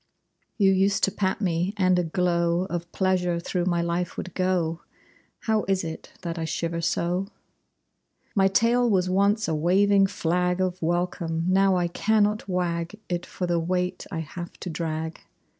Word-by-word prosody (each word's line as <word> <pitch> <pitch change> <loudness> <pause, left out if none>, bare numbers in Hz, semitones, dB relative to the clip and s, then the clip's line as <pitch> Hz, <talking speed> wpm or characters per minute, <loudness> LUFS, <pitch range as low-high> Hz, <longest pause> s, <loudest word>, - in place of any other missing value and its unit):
You 195 -3 +5
used 195 +1 +2
to 195 - +4
pat 190 0 -1
me, 180 +1 0
and 185 -2 +3
a - - +1
glow 170 0 +1
Of 170 0 -4
pleasure 180 -2 +1
through 175 +1 -2
my 175 -2 +1
life 170 +1 -2
would 185 - -5
go! 175 -3 0 0.6
How 220 -1 +1
is 195 -1 +1
it 160 -1 -7
that 170 -1 -4
I - - -2
shiver 165 +1 -2
so? 175 +3 0 1.1
My 195 -1 +4
tail 235 +5 +3
was 185 -3 +2
once 200 +3 +2
a 165 - 0
waving 195 +5 +4
flag 180 0 0
Of 185 -1 -1
welcome. 170 -1 -1
Now 190 0 +4
I 175 -1 +1
cannot 210 +3 +1
wag 175 +2 -2
It 175 0 -2
for 180 - -4
the 175 -1 +1
weight 180 +2 -2
I 160 - -2
have 170 +3 -7
to 180 - -4
drag. 160 0 -4
180 Hz, 165 wpm, -25 LUFS, 170-195 Hz, 1.1 s, You